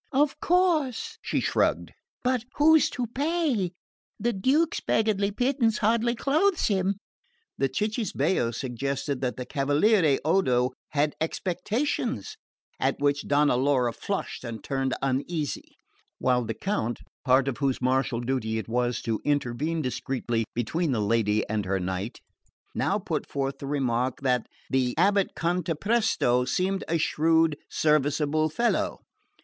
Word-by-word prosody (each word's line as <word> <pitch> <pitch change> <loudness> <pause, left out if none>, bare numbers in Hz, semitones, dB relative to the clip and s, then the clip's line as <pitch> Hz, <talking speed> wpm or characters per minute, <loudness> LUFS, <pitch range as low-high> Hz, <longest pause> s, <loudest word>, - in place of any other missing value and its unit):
"Of 285 +1 +2
course," 360 - +1
she - - -1
shrugged - - +1 0.3
"But 250 -2 +1
who's 315 +1 +5
to 250 - -3
pay? 275 - 0 0.5
The 240 +3 0
Duke's 275 - +2
beggarly 210 -2 +1
pittance 245 +1 +1
hardly 230 +2 +2
clothes 320 - +2
him." 195 0 +1 0.6
The 135 - +2
cicisbeo 185 - 0
suggested 135 +3 -3
that 125 -2 -2
the 125 - -4
cavaliere 145 - +3
Odo 130 -8 +2 0.2
had 145 0 +2
expectations; 200 - -2 0.4
at - - +1
which 145 0 0
Donna 145 -2 +3
Laura 125 -2 +2
flushed 195 +10 -4
and 115 -3 -6
turned 135 -1 -1
uneasy; 145 +3 -2 0.4
while 125 -2 +1
the 115 - -3
Count, 120 - -2 0.2
part 130 +1 +4
of 135 - -2
whose 135 -3 0
marital 130 -2 +1
duty 120 -3 -1
it 110 - -4
was 120 +1 -1
to 110 -2 -2
intervene 145 +3 0
discreetly 120 -3 -2
between 135 +5 0
his 110 - 0
lady 110 0 +1
and 110 -1 -1
her 95 +1 0
knight, 95 +4 -3 0.6
now - - +1
put - - -3
forth 135 0 -2
the 140 - -6
remark 130 -3 -1
that 125 -3 +1 0.2
the 130 -2 0
abate 200 +3 +2
Cantapresto 175 - +1
seemed 185 +9 0
a 165 - +1
shrewd 160 0 +2
serviceable 150 +1 +2
fellow. 235 +10 0
145 Hz, 130 wpm, -26 LUFS, 125-210 Hz, 0.6 s, who's